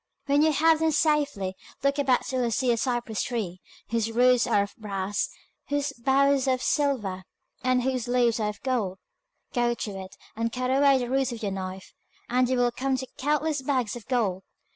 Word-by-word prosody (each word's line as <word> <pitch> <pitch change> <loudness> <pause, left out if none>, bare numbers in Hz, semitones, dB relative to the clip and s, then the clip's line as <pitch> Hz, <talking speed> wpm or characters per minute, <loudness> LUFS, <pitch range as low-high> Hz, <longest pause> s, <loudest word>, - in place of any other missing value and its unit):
When 285 0 +3
you 315 0 +4
have 320 +2 +4
them 320 0 +2
safely, 290 - +1 0.3
look 280 +1 +2
about 260 -3 +2
till 255 -1 -1
you 235 - +1
see 245 +2 +1
a 235 - +1
cypress 240 -4 -1
tree, 200 -7 -3 0.3
whose 230 -1 0
roots 250 +1 +4
are 200 - +3
of 200 - -9
brass, 200 -2 -2 0.4
whose 285 0 -1
boughs 275 +2 +2
are 260 - +4
of 255 - -7
silver, 225 -11 0 0.4
and 255 -1 +2
whose 255 -2 -1
leaves 240 -2 +2
are 210 -1 0
of 210 - -9
gold. 230 -8 -1 0.6
Go 240 -1 +1
to 215 - -4
it, 190 0 -10 0.2
and 230 +1 -1
cut 255 +1 -1
away 275 0 +5
the 245 -1 -2
roots 265 0 +1
with 230 -2 -7
your 200 - -1
knife, 190 0 -6 0.3
and 250 +1 +2
you 260 - +1
will 245 0 +3
come 265 +2 -1
to 260 - -4
countless 300 +1 0
bags 260 -5 0
of 240 - -10
gold. 215 -8 0
250 Hz, 200 wpm, -26 LUFS, 220-275 Hz, 0.6 s, away